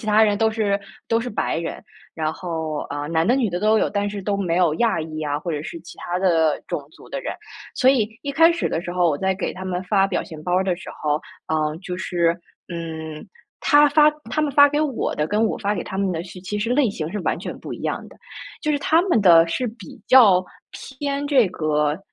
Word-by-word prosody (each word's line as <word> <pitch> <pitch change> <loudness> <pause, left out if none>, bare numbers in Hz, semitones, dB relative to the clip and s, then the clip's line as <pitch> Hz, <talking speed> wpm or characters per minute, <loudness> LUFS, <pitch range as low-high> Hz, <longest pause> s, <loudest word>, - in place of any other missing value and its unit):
其 215 - -9
他 215 +1 +5
人 205 -2 +3
都 225 -1 +3
是 205 -2 0 0.3
都 230 0 +1
是 245 - -4
白 205 - -1
人。 165 - -5 0.3
然 155 -1 -1
后， 160 -4 -4
呃， 145 0 -4
男 165 0 +1
的 245 +3 +3
女 235 -6 +1
的 175 +1 -3
都 215 +1 +3
有， - - +1
但 205 0 -1
是 205 -1 -6
都 200 +1 -1
没 175 -3 0
有 175 -4 +3
亚 230 -7 +2
裔 155 0 -7
呀， 145 -1 -2
或 165 +2 -4
者 150 0 -3
是 335 - -7
其 - - -13
他 175 +1 -3
的 165 -5 +2
种 - - -3
族 - - -17
的 - - -3
人。 - - -4 0.4
所 260 0 +5
以 225 -6 +2
一 280 - -3
开 330 +4 +6
始 340 - -1
的 160 - -1
时 175 - -6
候， 175 -1 +2
我 145 - -2
在 190 0 +1
给 190 - -3
他 185 0 -7
们 185 0 -3
发 195 0 +3
表 195 - -1
情 155 -2 -10
包 180 +2 -1
儿 190 - +2
的 185 -2 +1
时 190 - -11
候， 150 0 +1 0.3
呃， 155 0 0
就 180 -1 -5
是 170 -2 +1 0.4
嗯， 160 -2 -6 0.3
他 295 0 +5
发 300 +1 +6 0.2
他 305 - 0
们 295 -2 0
发 285 +1 +7
给 295 +1 0
我 285 -6 -1
的， 150 - 0
跟 210 +4 +1
我 - - -1
发 205 +1 -1
给 175 - -3
他 190 - -6
们 195 -2 0
的 165 - -3
是 180 0 -11
其 200 +3 -4
实 220 +3 -2
类 260 -2 +3
型 160 -5 -4
是 210 - -3
完 - - 0
全 - - -7
不 - - -8
一 - - -11
样 - - -3
的。 - - -17 0.5
就 305 - 0
是 290 - +1
他 325 +4 +3
们 350 - +2
的 170 -4 +7
是 250 +9 -1
比 230 +2 -10
较 200 -8 +6 0.3
偏 280 +1 -4
这 260 -8 +4
个 150 -3 0
190 Hz, 270 characters per minute, -22 LUFS, 165-230 Hz, 0.5 s, 发